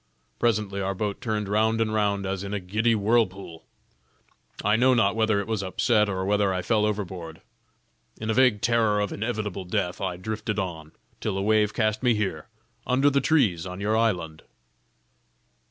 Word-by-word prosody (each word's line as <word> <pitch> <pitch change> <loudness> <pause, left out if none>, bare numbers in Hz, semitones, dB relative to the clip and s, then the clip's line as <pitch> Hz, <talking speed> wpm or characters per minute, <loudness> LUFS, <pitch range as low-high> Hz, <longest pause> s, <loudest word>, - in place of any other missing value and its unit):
Presently 105 -4 0
our 95 0 -2
boat 100 0 -3
turned 110 -4 -2
round 110 +2 +1
and 110 -1 0
round 100 -2 0
as 95 0 -3
in 100 +1 -4
a - - -1
giddy 110 +5 +1
whirlpool; 100 -6 0 1.0
I 105 - +4
know 130 +3 +4
not 105 -3 +2
whether 110 -2 +2
it 100 - -3
was 110 -2 -2
upset, 105 +3 +1
or 95 -1 -2
whether 100 0 +2
I 90 -1 -2
fell 105 +2 +2
overboard. 95 -6 -5 0.8
In 110 - -5
a 110 - +1
vague 120 -4 +3
terror 115 -3 +2
of 105 -1 -1
inevitable 105 -4 -3
death 90 -1 -2
I 95 -2 -2
drifted 105 +2 -4
on, 80 -6 -4 0.3
till 95 - -2
a - - -1
wave 105 0 +2
cast 110 -2 0
me 125 -3 +3
here, 105 +2 -3 0.4
under 135 +3 +3
the 140 0 +2
trees 115 - +2
on 90 +1 -7
your 105 +2 0
island." 90 -9 0
105 Hz, 175 wpm, -25 LUFS, 95-110 Hz, 1.0 s, I